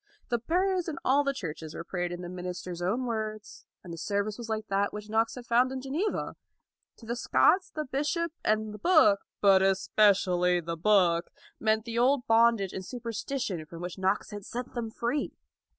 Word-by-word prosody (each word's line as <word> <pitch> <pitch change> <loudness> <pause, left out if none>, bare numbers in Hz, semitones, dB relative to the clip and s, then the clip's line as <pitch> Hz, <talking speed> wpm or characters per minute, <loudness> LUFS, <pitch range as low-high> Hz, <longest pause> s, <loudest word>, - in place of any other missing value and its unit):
The 240 -2 +1
prayers 360 - 0
in 310 -4 -4
all 280 +2 +4
the 280 - +1
churches 160 - -6
were - - -5
prayed 175 0 -3
in 175 0 -5
the - - -5
minister's 180 -1 -6
own 225 +9 0
words, 215 -2 -5 0.2
and 175 - -8
the 165 - -7
service 205 +3 -1
was 235 -1 -8
like 215 -1 -2
that 200 +1 +1
which 210 0 -8
Knox 225 +1 +1
had 250 -2 -9
found 245 +2 +3
in 265 - -4
Geneva. 295 +11 -2 0.6
To 230 - -14
the 235 +1 -2
Scots 365 +8 +3
the 305 0 -4
bishop 300 +5 -1
and 215 0 0
the 210 - -9
book, 300 - +5 0.2
but 195 -2 +6
especially 190 -2 +3
the 170 0 -4
book, 175 -2 +3 0.3
meant 220 0 +1
the 230 0 -2
old 255 +1 +3
bondage 225 -3 +3
and 190 - -5
superstition 230 - -4
from 170 +2 -9
which 180 +1 -6
Knox 190 +3 0
had 205 -1 -7
set 245 +5 -6
them 235 -2 -3
free. 240 +6 -2
215 Hz, 190 wpm, -29 LUFS, 190-250 Hz, 0.6 s, but